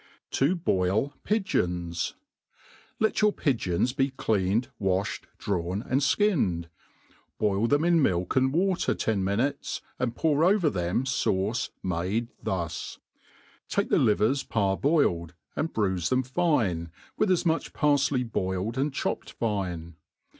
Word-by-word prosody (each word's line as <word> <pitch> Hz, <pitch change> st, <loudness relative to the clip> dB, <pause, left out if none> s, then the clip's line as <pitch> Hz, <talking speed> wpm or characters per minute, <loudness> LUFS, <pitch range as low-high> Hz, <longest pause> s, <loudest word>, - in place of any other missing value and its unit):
« -, -, -63 dB
To 145 Hz, +7 st, +3 dB
boil 110 Hz, -, +1 dB
Pigeons* 90 Hz, -, -1 dB, 0.8 s
LtiT 220 Hz, 0 st, +1 dB
your 210 Hz, 0 st, +5 dB
pigeons 120 Hz, -, 0 dB
be 135 Hz, +1 st, +1 dB
cleaned, 110 Hz, -1 st, 0 dB
wafhed, 95 Hz, 0 st, 0 dB
drawn, 95 Hz, +1 st, -2 dB
and 130 Hz, +2 st, 0 dB
flcinned. 135 Hz, -, +1 dB, 0.7 s
Boil 105 Hz, +1 st, +1 dB
them 145 Hz, +5 st, +2 dB
in 170 Hz, -2 st, +4 dB
milk 90 Hz, -8 st, +1 dB
and 130 Hz, 0 st, +3 dB
water 185 Hz, +4 st, +1 dB
ten 105 Hz, -4 st, 0 dB
minutes, 120 Hz, +9 st, -1 dB, 0.2 s
and 120 Hz, -2 st, -1 dB
pour 155 Hz, +1 st, +2 dB
over 185 Hz, -3 st, +4 dB
them 90 Hz, +5 st, 0 dB
fauce 115 Hz, -3 st, 0 dB
made 95 Hz, +6 st, -1 dB
thus: 85 Hz, -4 st, -3 dB, 0.7 s
take -, -, 0 dB
the -, -, +4 dB
livers 110 Hz, +6 st, +3 dB
parboiled, 95 Hz, -, +1 dB, 0.2 s
"and 165 Hz, -, -1 dB
bruife 95 Hz, -5 st, 0 dB
them 130 Hz, 0 st, +2 dB
fine, 125 Hz, -, 0 dB, 0.3 s
with 215 Hz, -, +1 dB
as 185 Hz, -1 st, +2 dB
much 165 Hz, -1 st, 0 dB
parfley 140 Hz, -3 st, +2 dB
boiled 100 Hz, +1 st, -2 dB
and 140 Hz, 0 st, 0 dB
chopped -, -, -3 dB
fine. 90 Hz, -7 st, -3 dB
115 Hz, 130 wpm, -27 LUFS, 95-145 Hz, 0.8 s, your